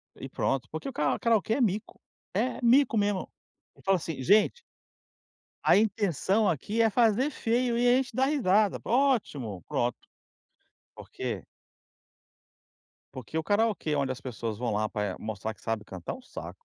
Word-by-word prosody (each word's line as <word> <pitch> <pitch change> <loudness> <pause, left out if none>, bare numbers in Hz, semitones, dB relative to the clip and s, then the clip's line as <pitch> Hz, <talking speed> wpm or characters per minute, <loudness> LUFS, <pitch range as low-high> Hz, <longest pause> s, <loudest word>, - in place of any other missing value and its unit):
E - - -8
pronto, 130 -2 -1
porque 160 - -5
o - - -9
karao 150 -8 0
karaokê 225 -2 +2
é 265 - 0
mico, 210 -2 -1 0.3
é 225 +7 0
mico 245 0 +4
mesmo. 205 -2 0 0.5
Eu - - -20
falo 195 0 +3
assim: 160 -5 -5
"Gente 210 - +4 1.0
a - - +6
intenção 205 0 +1
aqui 200 - -1
é 225 - +4
fazer 235 +4 +3
feio 240 -2 0
e 245 +1 +3
a 245 - +6
gente 260 -3 -2
dá 260 +1 +3
risada." 215 -8 +2
Ótimo, 200 - 0
pronto. 120 +1 0 1.0
Por - - -12
quê - - -4 1.7
porque 130 +4 -6
o 160 - -1
karaokê 205 -6 +1
onde 140 -2 0
as 130 - -12
pessoas 115 -4 -5
vão 120 +1 -2
lá 105 +1 0
pra 105 -3 -3
mostrar 110 0 -4
que - - -24
sabe 115 -2 -2
cantar, 90 -3 -7
é - - -8
um - - -15
saco. 475 - -10
200 Hz, 165 wpm, -28 LUFS, -, 1.7 s, a